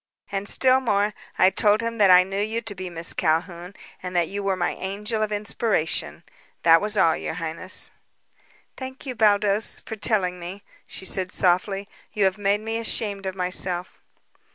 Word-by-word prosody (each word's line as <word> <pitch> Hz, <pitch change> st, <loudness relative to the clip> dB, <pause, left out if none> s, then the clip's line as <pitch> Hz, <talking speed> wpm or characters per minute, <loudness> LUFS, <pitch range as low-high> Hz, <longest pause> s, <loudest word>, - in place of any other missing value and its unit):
And, 200 Hz, 0 st, -1 dB
still 260 Hz, 0 st, +6 dB
more, 210 Hz, -4 st, 0 dB, 0.2 s
I 185 Hz, -, +5 dB
told 210 Hz, +2 st, +3 dB
him 230 Hz, 0 st, -4 dB
that 200 Hz, -2 st, +5 dB
I 180 Hz, 0 st, +8 dB
knew 195 Hz, +2 st, -3 dB
you 220 Hz, +2 st, -1 dB
to 225 Hz, -3 st, -5 dB
be 185 Hz, -1 st, -7 dB
Miss 170 Hz, 0 st, +1 dB
Calhoun 175 Hz, +3 st, -1 dB, 0.3 s
and 180 Hz, 0 st, -6 dB
that 170 Hz, -2 st, +2 dB
you 200 Hz, +3 st, -5 dB
were 195 Hz, -1 st, 0 dB
my 175 Hz, -1 st, -1 dB
angel 210 Hz, +3 st, -4 dB
of 215 Hz, 0 st, -1 dB
inspiration. 210 Hz, -4 st, -1 dB, 0.4 s
That 165 Hz, 0 st, +6 dB
was 210 Hz, +1 st, -2 dB
all, 165 Hz, -4 st, +4 dB
your -, -, -5 dB
highness." 165 Hz, +2 st, 0 dB, 0.8 s
"Thank 260 Hz, +1 st, -8 dB
you, 260 Hz, -, -4 dB
Baldos, 210 Hz, -2 st, +2 dB
for 220 Hz, -, -8 dB
telling 190 Hz, -4 st, 0 dB
me," 185 Hz, +4 st, -8 dB, 0.2 s
she 190 Hz, -, -5 dB
said 185 Hz, 0 st, 0 dB
softly. 195 Hz, +2 st, 0 dB, 0.3 s
"You 210 Hz, -2 st, 0 dB
have 190 Hz, +2 st, 0 dB
made 205 Hz, +1 st, +1 dB
me 225 Hz, +1 st, -3 dB
ashamed 205 Hz, -3 st, -1 dB
of 190 Hz, -, -4 dB
myself." 180 Hz, -1 st, -3 dB
195 Hz, 175 wpm, -24 LUFS, 180-215 Hz, 0.8 s, I